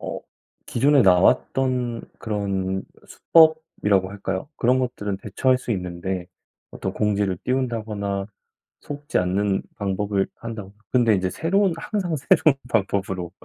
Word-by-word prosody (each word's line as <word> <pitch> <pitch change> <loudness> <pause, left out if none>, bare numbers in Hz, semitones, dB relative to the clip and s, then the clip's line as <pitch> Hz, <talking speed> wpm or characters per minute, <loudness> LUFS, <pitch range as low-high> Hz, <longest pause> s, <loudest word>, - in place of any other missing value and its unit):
어 - - -4 0.5
기존에 140 +2 +4
나왔던 120 +6 +2 0.2
그런 95 -3 -2 0.2
수법이라고 160 - +3
할까요, 95 +4 -4
그런 125 +2 +3
것들은 105 -6 -2
대처할 125 +6 +1
수 125 - -7
있는데 90 -1 -3 0.4
어떤 95 - -4
공지를 100 -3 0
띄운다거나 110 -6 -2 0.5
속지 145 0 -3
않는 95 +2 +1
방법을 100 -1 -1
한다거나 110 -4 -7 0.2
근데 120 -4 +4
이제 95 -1 0
새로운 190 +2 +1
항상 175 -1 -2
새로운 145 +1 +4
방법으로 95 -5 -1
105 Hz, 295 characters per minute, -23 LUFS, 95-130 Hz, 0.5 s, 기존에